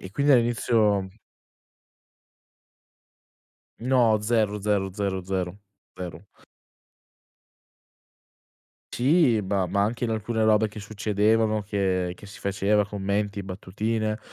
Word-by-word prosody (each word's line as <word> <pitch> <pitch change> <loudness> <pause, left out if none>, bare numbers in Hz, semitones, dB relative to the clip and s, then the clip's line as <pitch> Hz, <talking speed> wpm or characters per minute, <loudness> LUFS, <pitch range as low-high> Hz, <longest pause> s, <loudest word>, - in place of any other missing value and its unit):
E 95 - -9
quindi 140 +6 +2
all'inizio... 115 -5 +2 2.7
No, 120 -3 +3
zero, 105 -2 +1
zero, 100 -1 0
zero, 95 -2 -2
zero, 95 +1 -3 0.4
zero. 90 0 -7 2.7
Sì, 130 -4 +3
ma 95 -1 0
ma 100 +3 0
anche 115 +4 -1
in 115 - 0
alcune 110 +1 -1
robe 110 0 +4
che 105 +1 -10
succedevano, 110 +1 +1
che 95 -3 -1
che 105 - -13
si 105 - -12
faceva, 100 +1 +1
commenti, 100 0 -2
battutine, 105 +3 -3
105 Hz, 100 wpm, -25 LUFS, 100-110 Hz, 2.7 s, robe